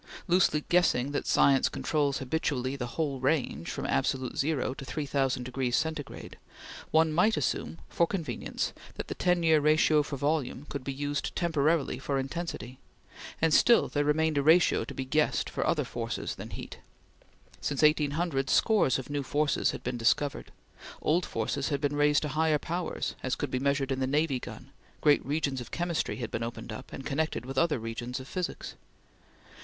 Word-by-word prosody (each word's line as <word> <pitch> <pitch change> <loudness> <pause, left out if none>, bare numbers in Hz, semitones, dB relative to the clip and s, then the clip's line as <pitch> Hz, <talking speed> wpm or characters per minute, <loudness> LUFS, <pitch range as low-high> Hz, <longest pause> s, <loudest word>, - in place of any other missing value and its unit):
Loosely 175 -4 +3
guessing 160 -7 +3
that 145 - -2
science 135 -1 +4
controls 145 -3 0
habitually 130 -1 -1
the 125 -3 -4
whole 145 -5 -1
range 130 - 0
from - - -4
absolute 130 - 0
zero 140 -3 0
to 135 - -9
3000 135 -2 -1
degrees 125 0 -1
Centigrade, 155 -2 -4 0.5
one 160 0 +3
might 210 +7 +3
assume, - - -2
for 170 - +1
convenience, 170 -5 -3 0.2
that - - -6
the - - -2
ten 180 -1 +1
year 160 -1 +5
ratio 155 0 +4
for 145 -1 -5
volume 145 -1 -1
could 140 -3 -5
be 135 - -3
used 145 +1 -3
temporarily 160 -5 +1
for 135 +1 -1
intensity; 135 -4 -4 0.6
and 165 -1 +2
still 240 +7 +5
there 145 - 0
remained 155 0 +2
a - - +2
ratio 160 +4 +4
to - - -8
be 135 - -3
guessed 150 +3 +1
for - - -1
other 150 - +2
forces 120 -3 -4
than - - -8
heat. - - -8 0.8
Since 140 0 -1
1800 150 -1 +2
scores 210 - +3
of 130 - -6
new 145 -1 -1
forces 145 +2 +1
had - - -5
been 125 0 -2
discovered; 140 +5 0 0.5
old 170 +4 +1
forces 125 +5 -2
had 140 -2 0
been 145 0 -1
raised 145 0 +3
to 150 - -2
higher 155 +1 +2
powers, 170 +3 -3
as 130 -2 -1
could - - -4
be 130 - 0
measured 140 0 0
in 130 - -1
the 130 - 0
navy 145 -1 +1
gun; 125 +3 -10 0.3
great 145 -1 +4
regions 140 -3 -1
of 120 - -9
chemistry 170 -1 -1
had 120 -3 -5
been 110 - -3
opened 115 -1 -5
up, 110 - -8
and 135 - -7
connected 150 -2 -1
with 135 +1 -2
other 170 -4 +2
regions 120 +2 -5
of 130 - -9
physics. 180 +3 -4
145 Hz, 180 wpm, -29 LUFS, 130-160 Hz, 0.8 s, year